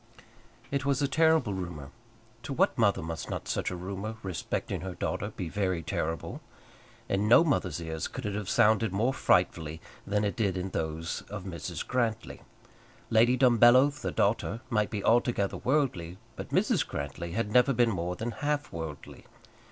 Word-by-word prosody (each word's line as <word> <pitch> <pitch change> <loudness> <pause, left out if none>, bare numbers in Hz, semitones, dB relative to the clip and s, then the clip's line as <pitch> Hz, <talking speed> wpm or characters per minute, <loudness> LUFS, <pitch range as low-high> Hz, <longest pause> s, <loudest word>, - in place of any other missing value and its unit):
It 140 -1 0
was 140 0 +1
a - - +3
terrible 160 -5 +3
rumour. 85 -7 -6 0.5
To - - -5
what - - +2
mother - - +2
must 80 0 -5
not - - -4
such - - -1
a 90 - -4
rumour 100 +4 -5
respecting 95 -3 -3
her 95 -1 -5
daughter 100 +3 -2
be 95 -4 -5
very 95 -2 -1
terrible? 80 +1 -3 0.7
In 100 +2 0
no 120 +8 +7
mother's 95 - 0
ears 80 -2 -4
could - - -7
it 105 - -2
have 105 -1 -4
sounded 110 -1 +3
more 115 +7 +1
frightfully 80 - +1 0.3
than 105 +1 +1
it 100 - -1
did 100 -5 0
in 90 +1 -3
those 80 +1 -3
of 105 -2 -6
Mrs. 85 -5 -5
Grantly. 115 -3 -2 0.7
Lady 120 +3 +5
Dumbello, 125 +2 +6
the 140 -2 -5
daughter, 115 +2 0
might 105 -2 +1
be 105 -2 -4
altogether 115 -4 +2
worldly; 120 - 0 0.2
but - - -7
Mrs. - - +2
Grantly 70 +4 -5
had 110 0 -1
never 125 +3 +5
been 120 -2 +3
more 90 -2 -2
than 115 +6 -3
half 145 +3 -2
worldly. 80 -3 -7
100 Hz, 165 wpm, -29 LUFS, 85-120 Hz, 0.7 s, no